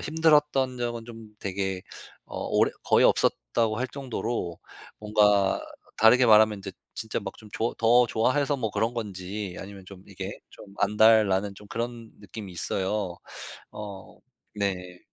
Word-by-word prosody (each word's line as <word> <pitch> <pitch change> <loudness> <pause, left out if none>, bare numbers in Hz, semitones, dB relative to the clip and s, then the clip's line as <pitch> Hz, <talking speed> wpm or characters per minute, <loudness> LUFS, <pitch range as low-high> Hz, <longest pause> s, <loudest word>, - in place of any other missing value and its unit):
힘들었던 150 -5 +2
적은 120 -1 -3
좀 115 -2 -11
되게 95 -1 -3 0.4
어 - - -7
오래 - - +2
거의 - - +4
없었다고 110 - +2
할 130 - 0
정도로 120 -10 -4 0.4
뭔가 105 -2 +3 0.4
다르게 125 +3 +6
말하면 110 -1 +6
이제 95 0 -7 0.2
진짜 110 0 -3
막 95 -1 -6
좀 110 - -13
좋 115 +2 -1
더 120 +2 +5
좋아해서 140 +6 +1
뭐 110 -5 -3
그런 115 +2 0
건지 100 -3 -5
아니면 95 -1 -10
좀 95 -1 -12
이게 - - -7
좀 - - -13
안달 110 +1 +5
나는 100 +1 0
좀 105 +1 -14
그런 115 -1 -5
느낌이 100 0 -9
있어요. 95 +1 -2 0.6
어 100 -2 -9 0.4
네. 90 -3 -3
105 Hz, 275 characters per minute, -26 LUFS, 95-115 Hz, 0.6 s, 다르게